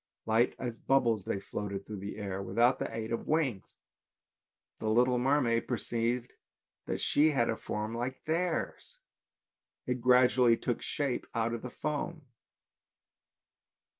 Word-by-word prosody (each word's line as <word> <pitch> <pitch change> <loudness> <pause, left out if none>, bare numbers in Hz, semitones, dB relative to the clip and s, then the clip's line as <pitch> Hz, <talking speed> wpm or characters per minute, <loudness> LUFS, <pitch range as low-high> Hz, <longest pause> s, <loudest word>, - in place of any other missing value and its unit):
Light 115 +2 +2
as 120 -2 -4
bubbles 120 -7 +2
they 100 - -1
floated 100 0 -5
through 105 -2 -6
the 100 +2 -6
air 100 -2 -4
without 120 +5 +2
the - - -3
aid 115 0 -4
of 115 - -3
wings. 140 -11 0 1.0
The 110 - -1
little 125 +2 +3
mermaid 125 -3 +2
perceived 120 +1 -1 0.5
that - - -2
she 150 +2 +3
had 120 -6 +2
a - - -1
form 105 0 -4
like 125 +3 -4
theirs, 175 - -2 0.9
it 125 -1 -2
gradually 125 -1 +5
took 120 0 -2
shape 140 -4 -2
out 115 0 0
of 115 - -4
the 125 - -6
foam. 150 +4 -4
120 Hz, 135 wpm, -31 LUFS, 110-130 Hz, 1.0 s, gradually